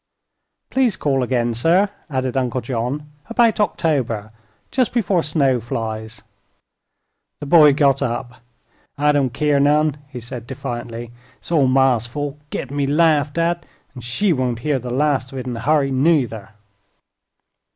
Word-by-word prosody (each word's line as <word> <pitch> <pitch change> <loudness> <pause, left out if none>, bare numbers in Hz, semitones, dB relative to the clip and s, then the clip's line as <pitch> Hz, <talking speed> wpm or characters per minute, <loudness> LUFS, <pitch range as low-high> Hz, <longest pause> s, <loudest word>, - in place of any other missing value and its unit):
"Please 250 -7 +1
call 135 -2 0
again, 120 -1 0
sir," 165 - +3 0.2
added 130 -2 -2
Uncle 130 -1 0
John; 130 +5 -4 0.2
"about 230 -2 +3
October 140 - 0 0.4
just 255 -3 +1
before 195 -6 +2
snow 140 -5 +1
flies." 110 -1 -5 1.2
The - - -6
boy 150 -1 +7
got 140 -1 +3
up. 125 0 -4 0.6
"I 150 +1 +3
don't 140 -4 +1
keer 145 +2 +1
none," 150 +1 +3
he 125 -3 -7
said, 120 0 -8
defiantly. 120 -2 -6 0.3
"It's - - -13
all 150 -6 +4
ma's 130 -3 +3
fault, 145 +3 -5
gittin' 140 +2 -5
me 140 -1 +1
laughed 150 0 +2
at, 170 0 0 0.3
an' 125 - -9
she 170 - 0
won't 125 -4 -2
hear 145 -3 +1
the 125 0 -7
last 135 0 0
of - - -6
it 130 - -5
in 125 -2 -4
a - - -5
hurry, 140 +2 +2
nuther." 130 -7 +1
135 Hz, 150 wpm, -20 LUFS, 120-150 Hz, 1.2 s, boy